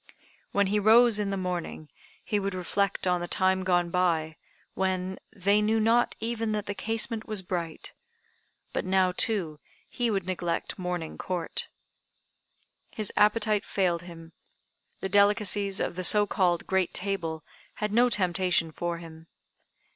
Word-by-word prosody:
When 200 Hz, 0 st, +2 dB
he 205 Hz, +2 st, +1 dB
rose 220 Hz, +1 st, +5 dB
in 205 Hz, -1 st, -1 dB
the 195 Hz, -, -2 dB
morning 180 Hz, -4 st, -4 dB, 0.4 s
he 210 Hz, -, 0 dB
would 195 Hz, -1 st, -3 dB
reflect 195 Hz, +2 st, -1 dB
on 180 Hz, -1 st, +1 dB
the 175 Hz, -, -3 dB
time 190 Hz, 0 st, +1 dB
gone 175 Hz, -2 st, +1 dB
by 165 Hz, -3 st, +1 dB, 0.4 s
when 190 Hz, 0 st, -2 dB
"they 200 Hz, +1 st, +2 dB
knew 220 Hz, +1 st, +2 dB
not 230 Hz, +2 st, +2 dB
even 225 Hz, -1 st, -2 dB
that 210 Hz, -1 st, -2 dB
the 205 Hz, -, -3 dB
casement 225 Hz, +2 st, -1 dB
was 215 Hz, -4 st, -2 dB
bright." 170 Hz, -3 st, -5 dB, 0.8 s
But -, -, -1 dB
now, 185 Hz, -1 st, +2 dB
too, 180 Hz, -6 st, +1 dB, 0.3 s
he 240 Hz, -1 st, -1 dB
would 195 Hz, -4 st, -1 dB
neglect 180 Hz, +1 st, -3 dB
"Morning 180 Hz, -3 st, -4 dB
Court." 180 Hz, -3 st, -3 dB, 1.2 s
His 215 Hz, -3 st, -3 dB
appetite 210 Hz, 0 st, +3 dB
failed 175 Hz, -4 st, 0 dB
him. 165 Hz, -2 st, -12 dB, 0.7 s
The -, -, -1 dB
delicacies 200 Hz, 0 st, +3 dB
of -, -, -2 dB
the 185 Hz, -, -4 dB
so 205 Hz, +4 st, +6 dB
called 180 Hz, -4 st, +1 dB
"great 190 Hz, -2 st, 0 dB
table" 180 Hz, -5 st, -3 dB, 0.3 s
had 210 Hz, -1 st, -3 dB
no 245 Hz, +2 st, +4 dB
temptation 180 Hz, -5 st, +1 dB
for 170 Hz, +2 st, -3 dB
him. 165 Hz, -1 st, -12 dB
190 Hz, 145 wpm, -27 LUFS, 175-210 Hz, 1.2 s, so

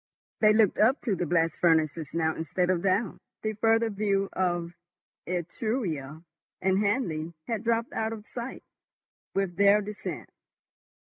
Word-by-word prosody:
They 215 Hz, -1 st, +6 dB
looked 215 Hz, -3 st, +3 dB
up 250 Hz, +6 st, +4 dB
to 220 Hz, -7 st, 0 dB
the 175 Hz, -1 st, -2 dB
blast 165 Hz, 0 st, +1 dB
furnaces 160 Hz, -2 st, +2 dB
now 160 Hz, -1 st, 0 dB
instead 180 Hz, +3 st, 0 dB
of 175 Hz, -2 st, 0 dB
down; 195 Hz, +4 st, 0 dB, 0.2 s
the 215 Hz, 0 st, -1 dB
further 225 Hz, +1 st, +2 dB
view 200 Hz, -1 st, 0 dB
of 175 Hz, -2 st, -1 dB, 0.5 s
Etruria 170 Hz, -, -3 dB, 0.4 s
and 190 Hz, 0 st, +2 dB
Hanley 170 Hz, -7 st, -1 dB
had 225 Hz, -2 st, -3 dB
dropped 230 Hz, 0 st, 0 dB
out 220 Hz, 0 st, -1 dB
of 215 Hz, -2 st, -7 dB
sight 240 Hz, +2 st, -6 dB, 0.7 s
with 195 Hz, -3 st, -1 dB
their 200 Hz, +1 st, +6 dB
descent. 210 Hz, 0 st, -6 dB
195 Hz, 140 wpm, -28 LUFS, 170-220 Hz, 0.7 s, They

